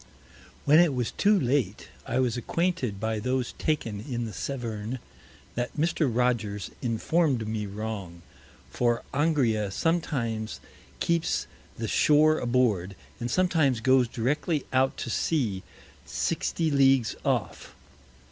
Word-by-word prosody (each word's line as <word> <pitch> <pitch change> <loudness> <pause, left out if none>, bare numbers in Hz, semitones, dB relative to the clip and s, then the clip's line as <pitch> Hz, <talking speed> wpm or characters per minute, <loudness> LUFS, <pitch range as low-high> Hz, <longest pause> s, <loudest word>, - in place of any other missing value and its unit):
When 150 +3 +7
it 170 -6 +4
was 125 -2 -1
too 205 0 +3
late, 125 - 0 0.2
I 125 -1 -1
was 125 -3 +1
acquainted 130 - -1
by 110 0 -1
those 125 +2 -1
taken 115 -10 -1
in 120 +1 -3
the 110 - -6
Severn, 115 0 -4 0.6
that 120 +4 -3
Mr. 160 -2 +1
Rogers 115 -5 0
inform'd 125 +1 +1
me 110 -1 -2
wrong; 100 -5 -6 0.5
for 120 - +1
Angria 135 -9 +2
sometimes 115 - -1 0.4
keeps 170 -1 0 0.3
the 115 - -3
Shore 155 +6 +4
aboard, 115 -7 +1 0.2
and 120 - -3
sometimes 160 -9 +2
goes 130 +1 +4
directly 140 +6 -1
out 130 +1 +2
to 120 - -4
Sea 115 - 0 0.5
60 160 -2 -1
Leagues 135 -4 +4
off. - - -2
125 Hz, 120 wpm, -27 LUFS, 110-150 Hz, 0.6 s, When